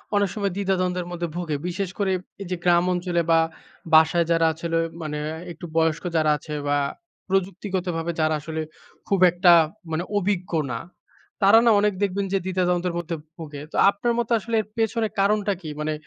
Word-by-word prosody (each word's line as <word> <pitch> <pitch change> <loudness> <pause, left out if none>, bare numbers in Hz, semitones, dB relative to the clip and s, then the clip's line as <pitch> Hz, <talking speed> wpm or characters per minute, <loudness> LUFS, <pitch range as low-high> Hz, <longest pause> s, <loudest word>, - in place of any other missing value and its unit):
অনেক 205 -1 +2
সময় 200 -2 -1
দ্বিধা 195 -1 0
দ্বন্দ্বের 180 -1 -1
মধ্যে 175 -1 -3
ভোগে। 165 -4 -2
বিশেষ 185 +1 -2
করে 195 -1 +1 0.3
এই 195 - -5
যে 180 - +1
গ্রাম 175 -1 +4
অঞ্চলে 175 -1 0
বা 165 - +6 0.5
বাসায় 160 +2 +5
যারা 165 -1 +3
আছে 160 +2 -9
হলো 165 0 +1 0.2
মানে 150 -1 -4 0.3
একটু 165 +1 -9
বয়স্ক 160 0 +2
যারা 155 -1 +3
আছে 150 - -9
বা 145 0 +2 0.5
প্রযুক্তিগতভাবে 185 -3 -1
যারা 155 0 +2
আসলে 160 +1 -4 0.5
খুব 195 -2 +1
একটা 175 +1 +5 0.4
মানে 160 +2 -1
অভিজ্ঞ 190 -2 -1 0.2
না 115 - -3 0.6
তারা 200 +3 +8
না 230 - +6
অনেক 210 0 +2
দেখবেন 200 0 0
যে - - +4
দ্বিধা 185 -1 0
দ্বন্দ্বের 180 0 0
মধ্যে 170 -1 -3 0.2
ভুগে। 150 -4 -8
তো - - -9
আপনার 205 +4 0
মতো 235 0 -2
আসলে 230 +2 -3
এর - - -12
পেছনে 225 0 +1
কারণটা 205 0 +2
কি? 155 - -7
মানে 155 0 -1
180 Hz, 185 wpm, -24 LUFS, 165-200 Hz, 0.6 s, তারা